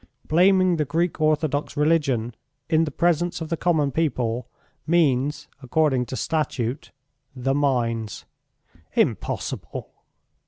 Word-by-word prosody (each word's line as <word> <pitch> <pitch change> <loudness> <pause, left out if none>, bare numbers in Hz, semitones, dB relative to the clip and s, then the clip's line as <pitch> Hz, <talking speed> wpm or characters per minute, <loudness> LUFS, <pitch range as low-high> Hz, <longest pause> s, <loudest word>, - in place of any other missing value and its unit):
Blaming 185 +1 +4
the 155 - +2
Greek 165 +3 -1
orthodox 155 -2 0
religion 145 -7 +1 0.3
in 165 0 +3
the - - -3
presence 175 +3 +1
of 160 -2 -5
the 165 - 0
common 155 -4 +1
people 125 -6 -1 0.4
means, 145 -3 +2
according 130 -2 +1
to 130 - -5
Statute... 135 -4 -2 0.5
the 135 +1 0
mines." 120 -6 -1 0.7
"Impossible!" - - -2
150 Hz, 110 wpm, -24 LUFS, 130-165 Hz, 0.7 s, Blaming